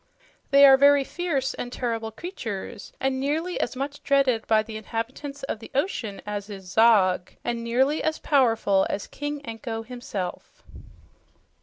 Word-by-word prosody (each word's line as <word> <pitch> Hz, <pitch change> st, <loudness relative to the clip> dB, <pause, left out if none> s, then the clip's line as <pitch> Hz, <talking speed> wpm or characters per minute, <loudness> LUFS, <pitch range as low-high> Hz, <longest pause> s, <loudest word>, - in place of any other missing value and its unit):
"They 280 Hz, 0 st, +8 dB
are 270 Hz, -1 st, +8 dB
very 285 Hz, 0 st, +6 dB
fierce 285 Hz, -4 st, -2 dB
and 245 Hz, -, -6 dB
terrible 230 Hz, -3 st, -2 dB
creatures 220 Hz, -, -6 dB
and 265 Hz, 0 st, 0 dB
nearly 315 Hz, +6 st, -1 dB
as -, -, -2 dB
much 280 Hz, +2 st, -4 dB
dreaded 270 Hz, -5 st, +2 dB
by 215 Hz, -1 st, +4 dB
the 220 Hz, 0 st, -9 dB
inhabitants 245 Hz, +6 st, -5 dB
of 245 Hz, -, -3 dB
the 225 Hz, -, -11 dB
ocean 260 Hz, -, -2 dB
as 205 Hz, 0 st, -5 dB
is 195 Hz, -2 st, -8 dB
Zog, 200 Hz, -5 st, +4 dB
and 235 Hz, -1 st, -2 dB
nearly 265 Hz, +6 st, +1 dB
as 315 Hz, 0 st, 0 dB
powerful 225 Hz, -9 st, +2 dB
as 200 Hz, -, -3 dB
King 290 Hz, 0 st, -5 dB
Anko 225 Hz, -1 st, -5 dB
himself." 220 Hz, -6 st, -6 dB
245 Hz, 150 wpm, -25 LUFS, 220-280 Hz, -, They